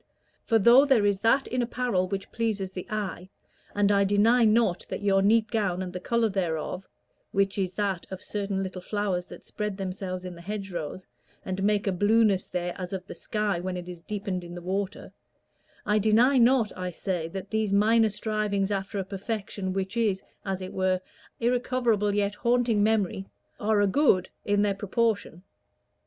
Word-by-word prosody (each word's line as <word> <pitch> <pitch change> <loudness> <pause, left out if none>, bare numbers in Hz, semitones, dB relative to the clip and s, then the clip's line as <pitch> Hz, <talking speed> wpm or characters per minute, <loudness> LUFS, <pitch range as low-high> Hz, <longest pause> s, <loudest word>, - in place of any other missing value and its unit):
For 225 - +3
though 235 +6 +7
there 265 -7 +3
is 200 -1 +2
that 230 +6 +3
in 255 - -1
apparel 240 -6 0
which 195 0 -5
pleases 210 -5 -2
the 185 -1 -7
eye, 205 -4 -4 0.5
and 205 0 +3
I 200 0 +4
deny 215 +5 +4
not 215 -4 +3
that - - -5
your 195 -1 +3
neat 220 +3 +3
gown 195 -5 0
and 180 -1 -6
the 180 - -4
color 235 +4 +1
thereof 180 -2 -3 0.4
which 195 0 +1
is 185 -1 -1
that 195 -3 -2
of 190 - -6
certain 200 -2 -2
little 185 -1 -6
flowers 190 -3 -2
that - - -12
spread 210 -2 -4
themselves 185 -1 -4
in 180 - -6
the 170 - -12
hedgerows, 185 -3 -5 0.4
and 185 0 -3
make 205 +1 +2
a 195 - +1
blueness 205 +1 +3
there 175 -1 -3
as 180 +1 -5
of 185 -1 -4
the - - -8
sky 210 -4 -1
when 180 +1 -3
it 175 0 -7
is 175 -2 -8
deepened 195 -1 -4
in 175 0 -9
the 175 - -7
water 190 +2 -3 0.7
I 210 +1 +2
deny 230 +6 +4
not, 240 -3 +3
I 180 0 -3
say, 180 -1 -3
that 190 +3 -7
these 220 -2 0
minor 220 +2 +4
strivings 210 -1 -1
after 195 +1 -2
a 195 - 0
perfection 195 0 -4
which 195 +2 -3
is, 215 -5 +1 0.2
as 190 -1 -3
it 185 - -7
were, 185 0 +2
an - - -4 0.4
irrecoverable 240 -4 +1
yet 205 0 +1
haunting 235 -1 +1
memory, 205 -3 +1 0.3
are 215 -1 +2
a - - +4
good 195 -4 +3
in 205 0 +2
their 205 -1 +2
proportion. 205 -3 -1
200 Hz, 185 wpm, -27 LUFS, 185-220 Hz, 0.7 s, though